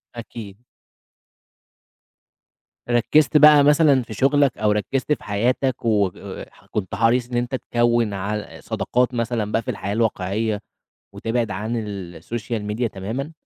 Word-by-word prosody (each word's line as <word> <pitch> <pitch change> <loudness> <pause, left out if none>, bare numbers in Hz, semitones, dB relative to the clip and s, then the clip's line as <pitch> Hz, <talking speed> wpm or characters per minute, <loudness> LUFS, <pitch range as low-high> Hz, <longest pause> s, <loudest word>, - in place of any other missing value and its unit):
أكيد. 115 -2 -9 2.2
ركّزت 130 +5 +3
بقى 150 -1 +8
مثلًا 145 -2 +5
في 110 - -9
شُغلك 140 +4 +2
أو 105 -1 +2
ركّزت 130 +7 0
في - - -6
حياتك 120 +5 0
و 100 -4 +2 0.5
وكنت 100 -2 -4
حريص 115 +3 +2
إن 120 - -2
أنت 120 +2 -1
تكوّن 120 -3 +1
عل 105 +2 -5
صداقات 125 +1 0
مثلًا 115 -3 -2
بقى 115 - +1
في 125 - -3
الحياة 100 -1 -4
الواقعية 105 -1 -1 0.5
وتبعِد 115 -1 -2
عن 105 +4 -3
السوشيال 105 +4 -5
ميديا 110 +3 -1
تمامًا؟ 115 +10 -5
115 Hz, 125 wpm, -22 LUFS, 105-125 Hz, 2.2 s, بقى